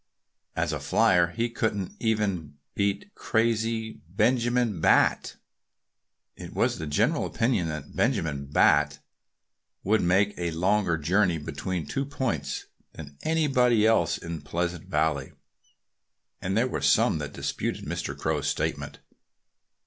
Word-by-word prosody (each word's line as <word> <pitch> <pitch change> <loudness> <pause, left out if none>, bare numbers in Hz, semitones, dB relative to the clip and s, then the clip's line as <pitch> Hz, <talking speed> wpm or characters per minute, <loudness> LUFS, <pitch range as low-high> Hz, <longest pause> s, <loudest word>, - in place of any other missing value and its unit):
"As - - 0
a - - -2
flier 90 -2 +3
he 115 +7 -2
couldn't 110 -5 -2
even 100 -10 -1 0.2
beat 100 - -1
crazy 115 -1 -1
Benjamin 120 -1 +1
Bat." - - +3 1.0
It - - -10
was - - +1
the 80 - -4
general 75 - +1
opinion 115 -8 0
that 80 -1 -6
Benjamin 70 -4 0
Bat 75 0 +3 0.9
could 110 +3 +2
make 95 +4 +3
a 85 -1 -1
longer 90 +1 +1
journey 90 +3 +2
between 75 +3 -4
two 135 - -2
points 130 -4 -3 0.3
than 70 -2 -10
anybody 130 -8 +3
else 85 -7 +3
in 85 -2 -6
Pleasant 85 +3 -3
Valley. 75 -3 0 1.1
And 95 +2 -1
there 120 +3 +3
were - - -3
some 80 - +3
that 75 -1 -5
disputed 70 0 -3
Mr. - - -4
Crow's - - -1
statement. - - -2
95 Hz, 125 wpm, -27 LUFS, 80-115 Hz, 1.1 s, flier